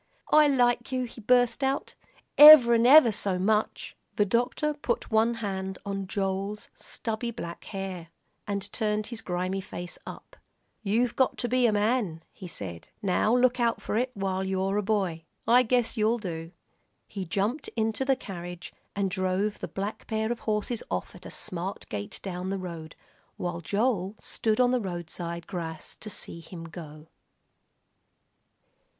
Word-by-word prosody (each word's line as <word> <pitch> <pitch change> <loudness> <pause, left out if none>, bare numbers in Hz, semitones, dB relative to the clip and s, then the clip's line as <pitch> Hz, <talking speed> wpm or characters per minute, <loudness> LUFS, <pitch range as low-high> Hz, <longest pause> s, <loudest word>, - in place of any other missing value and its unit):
"I 305 -1 +7
like 245 -3 +2
you," 255 -1 0
he 235 -1 -9
burst 245 +4 +3
out, 270 +1 -1 0.4
"ever'n 245 -6 +10
ever 270 -4 +9
so 195 -2 0
much." 210 +3 0 0.2
The 205 - +3
doctor 245 +8 0
put 285 -6 -3
one 225 +2 +3
hand 190 -3 -4
on 195 -1 -3
Joel's 195 +1 -3
stubby 225 0 -4
black 170 -8 -7
hair, 190 -4 -5 0.4
and 200 -1 -2
turned 215 -2 0
his 225 - -6
grimy 185 0 -2
face 175 -2 -8
up. - - -10 0.4
"You've 230 +3 +1
got 260 - +2
to 245 - -2
be 250 0 +3
a - - +3
man," 205 -6 0
he 190 - -10
said; 90 - -7
"now 210 +4 +2
look 250 0 +3
out 235 -1 +1
for - - -4
it 250 +4 +1
while 190 -1 -1
you're 190 +1 0
a - - +2
boy. 190 -6 -1 0.2
I 245 +2 +7
guess 245 -1 +1
you'll 220 +1 +2
do." 165 -6 -6 0.6
He 195 -2 -5
jumped 205 - -1
into 225 +2 0
the 270 0 +3
carriage 175 -6 -8 0.2
and 200 -1 +1
drove 190 +2 -1
the - - -4
black 200 +2 -5
pair 220 0 -1
of 240 - -3
horses 215 +2 -1
off - - -3
at - - -11
a - - -8
smart 185 +2 -3
gait 100 -1 -5
down 185 -1 -4
the 195 - -1
road, 170 -4 -7 0.4
while 175 -1 -3
Joel 205 0 0
stood 220 0 -1
on 250 -1 +4
the 250 -1 +1
roadside 170 -2 -5
grass 165 -4 -6
to 215 - -7
see 170 - -6
him 165 0 -9
go. 155 -2 -10
205 Hz, 160 wpm, -27 LUFS, 185-235 Hz, 0.6 s, ever'n